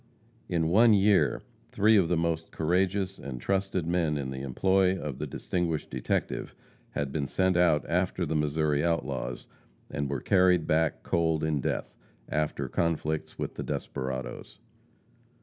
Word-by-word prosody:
In 80 -2 +1
one 110 +4 +6
year, 100 0 +3 0.3
three 110 +2 +4
of 95 -5 +4
the 90 - +2
most 80 0 -1
courageous 95 +4 0
and 65 -3 -6
trusted 95 +2 -1
men 85 -3 +1
in 65 -2 -3
the 65 0 -5
employ 95 +7 +2
of 70 -3 -5
the 75 - -3
distinguished 85 +1 -2
detective - - -2 0.4
had 70 0 -2
been 70 -1 -2
sent 95 +3 +1
out 85 -4 +3
after 90 +1 0
the 80 - -2
Missouri 75 -1 +1
outlaws, 70 -7 -2 0.5
and 70 -1 -2
were 70 -1 -2
carried 90 +1 +3
back 80 0 +1
cold 80 -2 +1
in 75 -3 0
death, - - -2 0.3
after 75 0 -1
conflicts 80 -2 -1
with - - -4
the - - -5
desperadoes. 65 -1 -5
80 Hz, 150 wpm, -28 LUFS, 75-90 Hz, 0.5 s, one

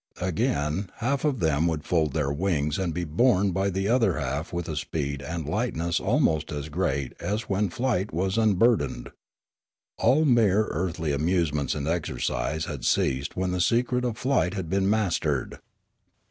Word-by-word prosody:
Again 90 0 -1
half 135 +4 -1
of 145 -6 0
them 80 0 +2
would 80 -3 -2
fold 80 -5 +1
their 70 -3 0
wings 75 -2 0
and 95 -3 -1
be 90 +2 -3
borne 95 +4 +2
by 95 +2 0
the 95 +1 -1
other 115 -6 +2
half 70 +3 -3
with 85 0 -3
a 80 - -3
speed 70 -1 -3
and 80 0 -5
lightness 85 -3 -1
almost 80 0 +1
as 75 0 -4
great 70 -5 -1
as 105 +3 -2
when 100 -2 0
flight 110 -2 -1
was 95 +4 -1
unburdened. 110 - +2 0.9
All 155 +4 +4
mere 110 -6 +4
earthly 80 -2 -2
amusements 75 -2 0
and 70 -1 -3
exercise 80 -3 -1
had 70 -5 -6
ceased 65 +5 0
when 95 0 0
the 90 0 0
secret 125 +6 +1
of 120 -3 -2
flight 125 -8 +1
had 90 -4 -4
been 95 0 +2
mastered. 90 -9 0
85 Hz, 160 wpm, -26 LUFS, 75-105 Hz, 0.9 s, All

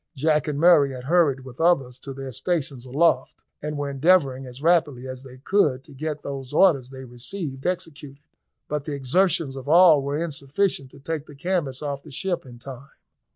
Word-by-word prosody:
Jack 150 +1 +1
and 150 -2 -2
Murray 150 -5 +5
had 125 -1 -7
hurried 145 -3 +2
with 130 +2 -9
others 135 -7 +2
to 135 - -8
their 135 0 -7
stations 135 -3 -3
aloft, 135 -1 +1 0.2
and 150 0 -4
were 145 0 -2
endeavouring 135 -3 +2
as 125 +1 -10
rapidly 150 -5 +2
as 130 -1 -7
they 130 -1 -12
could 140 -3 +1
to 145 - -15
get 150 +2 -4
those 135 -1 -6
orders 150 -7 +4
they 130 0 -9
received 135 +4 -5
executed, 150 -5 -5 0.4
but 150 -1 -3
the 150 - -3
exertions 140 +1 +1
of 135 +1 -7
all 165 -3 +7
were 140 +1 -2
insufficient 145 -1 -2
to 140 - -15
take 155 +1 -4
the 145 - -12
canvas 150 -4 -2
off 140 -1 -3
the 155 - -14
ship 175 +2 -3
in 120 -1 -12
time. 135 +2 -10
140 Hz, 190 wpm, -24 LUFS, 130-160 Hz, 0.4 s, all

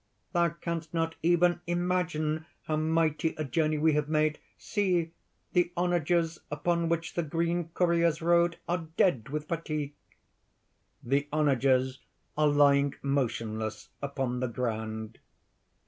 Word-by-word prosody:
"Thou 170 -1 +3
canst 170 0 -5
not 165 0 0
even 175 +1 +3
imagine 175 -3 0 0.2
how 155 - -1
mighty 160 +1 +1
a 155 - -1
journey 155 +1 +1
we 155 +1 +3
have 150 0 0
made. 155 0 +1 0.2
See! 180 -6 0 0.4
the 175 -1 +3
onagers 170 -1 +1
upon 170 +3 0
which 165 0 -1
the 170 - 0
green 170 +2 -1
couriers 170 -2 +2
rode 170 0 +3
are 175 -1 -1
dead 130 - +2
with 150 +1 -4
fatigue!" 155 -3 -3 1.1
(_The 140 +4 +1
onagers 135 -3 +2 0.4
are 150 0 +3
lying 140 -1 +4
motionless 115 -6 -2
upon 135 -3 -2
the 130 - 0
ground. 110 -2 -4
155 Hz, 125 wpm, -29 LUFS, 140-170 Hz, 1.1 s, lying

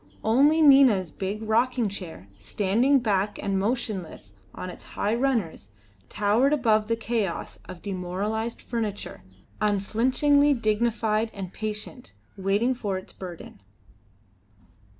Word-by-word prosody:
Only 285 +8 +4
Nina's 260 - +6
big 200 +3 -4
rocking 235 +2 +1
chair, 175 - -8
standing 220 - +2
black 205 -2 0
and 195 -1 -1
motionless 195 - -3 0.2
on 185 - -7
its - - -13
high 210 - -2
runners, 230 - -1 0.4
towered 215 +8 +2
above 220 -7 +2
the 230 - +1
chaos 225 -5 -3
of 175 - -10
demoralised 200 +4 -3
furniture, 220 -4 -4 0.4
unflinchingly 255 +8 +2
dignified 225 -1 0
and 190 -2 -6
patient, 215 +4 -6 0.2
waiting 200 +6 +1
for 205 -6 -3
its 185 - -10
burden. 175 - -10
215 Hz, 110 wpm, -26 LUFS, 195-240 Hz, 0.4 s, Nina's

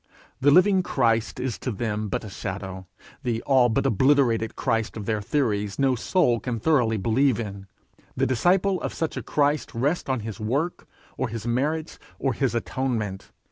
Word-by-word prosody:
The 140 - +4
living 185 +5 +5
Christ 115 - 0
is 125 -3 -3
to - - -3
them 105 -1 -2
but - - -2
a 105 - -7
shadow; 95 -2 -6 0.3
the 120 -4 -2
all 130 -3 +4
but 135 +5 0
obliterated 125 -2 +2
Christ 115 0 -1
of 105 - -5
their 110 -1 -1
theories 105 -5 -1
no 135 -1 +3
soul 125 -1 +2
can 120 -2 -3
thoroughly 120 -5 +2
believe 120 +4 +2
in: 100 -3 -6 0.5
the - - +2
disciple 180 - +2
of - - -4
such 160 - -2
a - - -3
Christ 145 -2 0
rests 140 +7 0
on 130 -3 0
his 110 -1 -6
work, 140 +11 -2 0.3
or - - -1
his 110 -1 -6
merits, 150 +7 -1 0.2
or 135 -2 0
his 130 -1 0
atonement! 115 -5 -2
120 Hz, 175 wpm, -25 LUFS, 110-140 Hz, 0.5 s, living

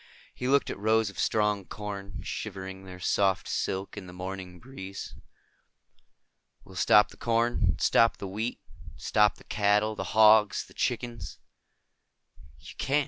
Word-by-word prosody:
He 125 - -4
looked 140 +1 +3
at - - -7
rows 110 0 +2
of 95 - -12
strong 105 -2 +1
corn, 100 0 -7
shivering 95 -2 -6
their 90 -1 -10
soft 95 0 +1
silk 95 +1 -3
in 100 -3 -8
the 90 - -10
morning 90 -1 -7
breeze. 95 -6 -8 1.5
"We'll 95 - -15
stop 105 +4 +5
the - - -16
corn. 115 -6 +1
Stop 115 0 +4
the 100 - -6
wheat. 110 +5 -3 0.4
Stop 105 0 +2
the - - -17
cattle, 105 +1 +1
the - - -4
hogs, 110 -2 +6
the - - -18
chickens." 115 -9 -3 1.2
"You - - -11
can't." 145 +2 +2
105 Hz, 140 wpm, -28 LUFS, 95-110 Hz, 1.5 s, hogs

